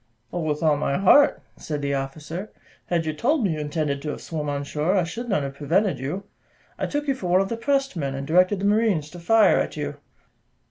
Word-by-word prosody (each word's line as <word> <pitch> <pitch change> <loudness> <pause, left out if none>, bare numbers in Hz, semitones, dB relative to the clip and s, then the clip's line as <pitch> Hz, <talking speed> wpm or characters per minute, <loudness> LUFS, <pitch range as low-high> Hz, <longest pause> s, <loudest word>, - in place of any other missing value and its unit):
"Oh, 175 - -1
with 155 -1 -2
all 155 -2 +4
my 140 -1 0
heart," 240 +10 +5
said 150 -2 -4
the 140 0 0
officer; 150 +8 -4 0.4
"had 170 -2 0
you 155 - -1
told 260 - +1
me 195 - +2
you 155 - -4
intended 150 -1 -2
to 150 - -4
have - - -5
swum 150 -3 -4
on 145 0 -2
shore, 150 +6 0
I 185 - +3
should 230 +9 -5
not 195 -9 +1
have 135 0 -4
prevented 170 - +1
you; 150 +10 -4 0.6
I - - -1
took 290 0 -3
you 275 - +3
for 230 -9 -5
one 180 +1 +4
of 195 - -2
the 230 - -2
pressed 270 +1 0
men, 140 -5 -2
and 135 0 -4
directed 180 +6 +3
the - - -1
marines 205 -8 +2
to 175 - -9
fire 220 +6 +4
at - - -3
you." - - -4
170 Hz, 235 wpm, -24 LUFS, 150-205 Hz, 0.6 s, heart